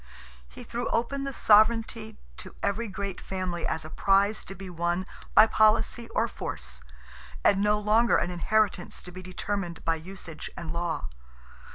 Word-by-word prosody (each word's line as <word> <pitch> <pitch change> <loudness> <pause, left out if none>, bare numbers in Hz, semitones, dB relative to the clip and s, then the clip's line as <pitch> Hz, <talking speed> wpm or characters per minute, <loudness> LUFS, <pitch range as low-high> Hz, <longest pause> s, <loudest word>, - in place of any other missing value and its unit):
He - - -11
threw 240 +1 -3
open 275 +4 -1
the 275 - -3
sovereignty 220 -1 +3 0.2
to - - -9
every 210 +4 0
great 200 -1 -5
family 185 -2 -3
as 160 - -2
a - - -7
prize 200 +2 +2
to 195 - -8
be 195 0 -9
won 175 +1 -1 0.3
by - - +10
policy 220 +2 +2
or - - +1
force, 60 0 -5 0.6
and 195 - +4
no 210 +1 +3
longer 215 +2 +3
an 175 - -1
inheritance 185 +1 0
to 180 - -10
be 185 +1 -9
determined 185 -1 -4
by 165 - +3
usage 165 -1 -8
and 165 -1 -5
law. 170 - -2
195 Hz, 160 wpm, -28 LUFS, 175-220 Hz, 0.6 s, by